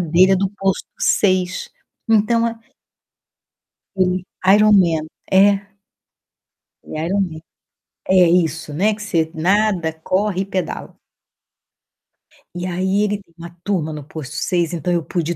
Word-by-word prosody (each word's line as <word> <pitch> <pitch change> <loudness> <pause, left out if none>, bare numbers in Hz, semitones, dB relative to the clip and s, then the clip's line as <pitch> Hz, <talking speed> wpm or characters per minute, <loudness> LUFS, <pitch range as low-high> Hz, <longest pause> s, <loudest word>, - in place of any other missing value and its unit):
dele 180 +3 +4
é - - +4
do 195 0 0
posto 195 -1 -1
6. 185 -2 +1 0.4
Então 225 +2 +3
a 230 0 -4 1.4
ele 185 -1 0 0.2
Ironman. 190 -6 +4 0.2
É 200 +1 +4 1.1
ele - - -9
é 160 - -2
Ironman. 180 -5 -1 0.7
É, 190 - +3
isso, 165 -3 +1
né, 210 +6 +2
que 210 - -10
você 165 -6 0
nada, 185 -1 +1
corre 195 0 0
e - - -6
pedala. 185 -4 -4 1.6
E 175 +1 -4
aí 190 +3 0
ele 205 -1 -1
tem 170 -3 -28
uma 170 +1 -10
turma 165 -6 -1
no 150 - -7
posto 145 0 -8
6, 175 -2 -1
então 175 +1 -2
eu 170 -2 +1
pude 175 0 -2
ir - - -12
185 Hz, 135 wpm, -19 LUFS, 170-200 Hz, 1.6 s, dele